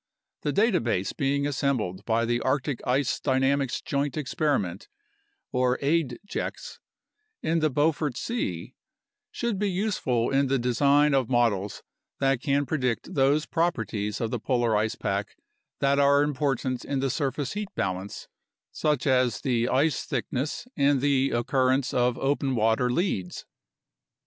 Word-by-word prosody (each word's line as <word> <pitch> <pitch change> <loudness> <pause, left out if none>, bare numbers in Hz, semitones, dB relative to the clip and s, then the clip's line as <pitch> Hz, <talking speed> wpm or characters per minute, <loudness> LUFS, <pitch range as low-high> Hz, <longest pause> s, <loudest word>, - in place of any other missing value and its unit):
The 145 - -1
data 205 +3 +3
base 105 -5 -1
being 140 +1 0
assembled 130 -10 -1
by 115 0 +1
the 120 +1 0
Arctic 130 0 -1
Ice 130 +1 +1
Dynamics 135 -1 +1
Joint 140 +1 -1
Experiment 135 - -1 0.7
(aidjex) 130 - -1 0.6
in 165 +1 +1
the 155 -1 +2
Beaufort 145 -1 0
Sea 95 - -3 0.6
should 235 -5 -2
be 205 -1 +1
useful 180 - 0
in 135 0 +2
the 135 +1 +2
design 140 +4 +3
of 130 -4 +1
models 110 -5 +1 0.4
that 135 -2 +1
can 140 +1 +1
predict 125 -6 -2
those 140 +2 +3
properties 115 -11 -1
of 115 -1 -2
the 125 - -2
polar 120 -2 +1
ice 110 +1 0
pack 100 -1 -3 0.4
that 140 +1 +3
are 140 0 +5
important 135 -3 -1
in 140 - -2
the 135 -1 0
surface 140 0 -2
heat 205 -1 -4
balance, 95 +1 -3 0.4
such 150 -3 0
as 130 -3 +2
the 120 -3 +1
ice 145 +4 +1
thickness 135 - -3
and 140 0 +3
the 135 0 +2
occurrence 130 +2 +1
of 125 0 +2
open 135 -1 0
water 115 +2 +2
leads. 120 - -2
135 Hz, 135 wpm, -26 LUFS, 120-145 Hz, 0.7 s, are